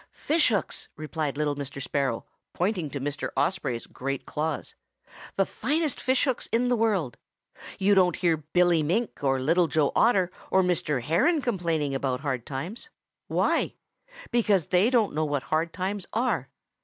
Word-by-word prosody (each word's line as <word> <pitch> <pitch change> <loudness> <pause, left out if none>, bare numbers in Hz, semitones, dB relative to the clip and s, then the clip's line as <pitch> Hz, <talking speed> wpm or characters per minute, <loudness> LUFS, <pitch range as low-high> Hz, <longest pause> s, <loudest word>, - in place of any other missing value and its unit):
"'Fishhooks!' 290 - 0
replied 155 -2 -3
little 150 -1 0
Mr. 140 -1 -6
Sparrow, 135 -3 -1 0.3
pointing 180 -4 -1
to 140 - -5
Mr. 145 +2 -3
Osprey's 140 -5 0
great 135 +1 -4
claws, 155 0 -3 0.6
'the 195 - +3
finest 295 - -1
fishhooks 260 0 +1
in 245 +2 +2
the 245 - +3
world. 205 - 0 0.6
You 200 +1 +3
don't 180 -3 +4
hear 170 -3 +2
Billy 170 +2 +2
Mink 180 +5 -1
or 135 -1 +2
Little 165 +6 +3
Joe 150 0 +2
Otter 190 -6 +3 0.2
or 190 - +4
Mr. 150 -7 0
Heron 260 - +3
complaining 170 - -1
about 135 -1 -1
hard 130 -5 -3
times. 165 - -5 0.4
Why? - - +1 0.6
Because 210 -8 +2
they 185 +5 +4
don't 235 -5 +2
know 155 +1 0
what 145 -3 -1
hard 155 +9 0
times 190 +2 -3
are. 215 - 0
170 Hz, 150 wpm, -27 LUFS, 145-205 Hz, 0.6 s, don't